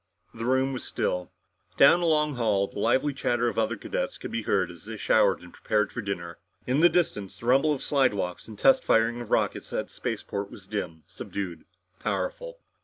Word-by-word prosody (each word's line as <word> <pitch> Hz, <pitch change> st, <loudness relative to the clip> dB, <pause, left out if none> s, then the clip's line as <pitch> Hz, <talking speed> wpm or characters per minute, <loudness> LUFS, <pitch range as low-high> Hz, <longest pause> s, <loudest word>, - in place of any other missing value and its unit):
The 115 Hz, 0 st, -5 dB
room 130 Hz, +2 st, +2 dB
was 130 Hz, -, -5 dB
still. 90 Hz, 0 st, -2 dB, 0.5 s
Down 175 Hz, -, +7 dB
the 175 Hz, -, 0 dB
long 150 Hz, -2 st, +2 dB
hall, 110 Hz, -6 st, +1 dB
the 100 Hz, -, -8 dB
lively 130 Hz, +7 st, +2 dB
chatter 120 Hz, -3 st, 0 dB
of -, -, -3 dB
other 110 Hz, +1 st, 0 dB
cadets -, -, -3 dB
could -, -, -7 dB
be 115 Hz, -, -2 dB
heard 95 Hz, -4 st, 0 dB
as 85 Hz, +2 st, -14 dB
they 110 Hz, 0 st, -6 dB
showered -, -, +3 dB
and 90 Hz, -, -13 dB
prepared 105 Hz, -1 st, 0 dB
for 120 Hz, -, -4 dB
dinner. 85 Hz, -5 st, -5 dB, 0.3 s
In 130 Hz, +3 st, +1 dB
the 175 Hz, +2 st, +7 dB
distance, 105 Hz, -, -1 dB
the -, -, -11 dB
rumble 135 Hz, +5 st, +4 dB
of 145 Hz, -, -1 dB
the -, -, -5 dB
slidewalks 105 Hz, -11 st, 0 dB
and 110 Hz, -2 st, -10 dB
test 265 Hz, -1 st, +5 dB
firing 115 Hz, +2 st, +2 dB
of 120 Hz, -, -8 dB
rockets -, -, 0 dB
at -, -, -3 dB
the -, -, -16 dB
spaceport 100 Hz, 0 st, -4 dB
was -, -, -11 dB
dim, 80 Hz, -1 st, -5 dB
subdued, 90 Hz, -5 st, -6 dB, 0.3 s
powerful. -, -, -3 dB
115 Hz, 205 wpm, -27 LUFS, 100-135 Hz, 0.5 s, Down